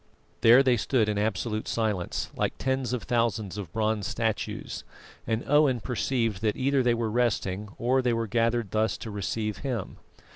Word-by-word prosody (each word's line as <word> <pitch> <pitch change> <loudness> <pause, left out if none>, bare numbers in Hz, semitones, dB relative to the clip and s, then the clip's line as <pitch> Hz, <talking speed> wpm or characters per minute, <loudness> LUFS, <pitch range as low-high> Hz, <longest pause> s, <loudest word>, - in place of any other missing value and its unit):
There 120 +4 +7
they 125 -3 +3
stood 115 0 +1
in 105 -1 0
absolute 110 +1 -1
silence, 105 -6 -1
like - - -1
tens 130 -1 -1
of 125 -3 -2
thousands 115 -5 0
of 90 -5 -7
bronze 110 -1 0
statues, 110 -2 -3 0.4
and 115 0 0
Owen 145 -4 +4
perceived 115 -4 -1
that 110 -1 0
either 135 +1 +2
they 120 -1 +3
were 115 -2 -1
resting 105 -4 0
or 125 +3 +2
that - - -12
they - - +2
were 115 0 0
gathered 115 -2 0
thus 110 +1 +1
to 110 - -7
receive 105 +1 -2
him. 125 -8 -4
115 Hz, 175 wpm, -27 LUFS, 105-125 Hz, 0.4 s, There